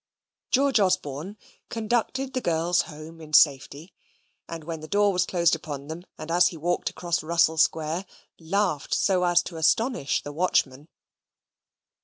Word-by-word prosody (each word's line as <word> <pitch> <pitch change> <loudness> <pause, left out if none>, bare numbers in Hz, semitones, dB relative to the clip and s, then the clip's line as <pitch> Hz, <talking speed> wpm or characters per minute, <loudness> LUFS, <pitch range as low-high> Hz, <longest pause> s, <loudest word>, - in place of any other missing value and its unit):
George 270 -2 +3
Osborne 185 -1 -1 0.3
conducted 240 +4 -2
the 255 - -1
girls 170 -1 +1
home 160 +1 -11
in 155 -1 -12
safety: 145 +3 +3 0.6
and 165 -1 -7
when 165 0 -5
the 155 - -9
door 205 +2 +2
was 180 0 +1
closed 170 -2 +2
upon 145 -2 -8
them, 170 +3 -7
and 160 - -7
as 175 +1 +5
he 170 - -5
walked 175 +3 -1
across 175 -1 -2
Russell 160 0 +2
Square, 160 +3 0 0.3
laughed 175 -2 -1
so 185 -3 +2
as 175 0 +3
to 170 - -8
astonish 160 - +1
the 145 - -7
watchman. 145 -4 0
170 Hz, 150 wpm, -25 LUFS, 155-190 Hz, 0.6 s, as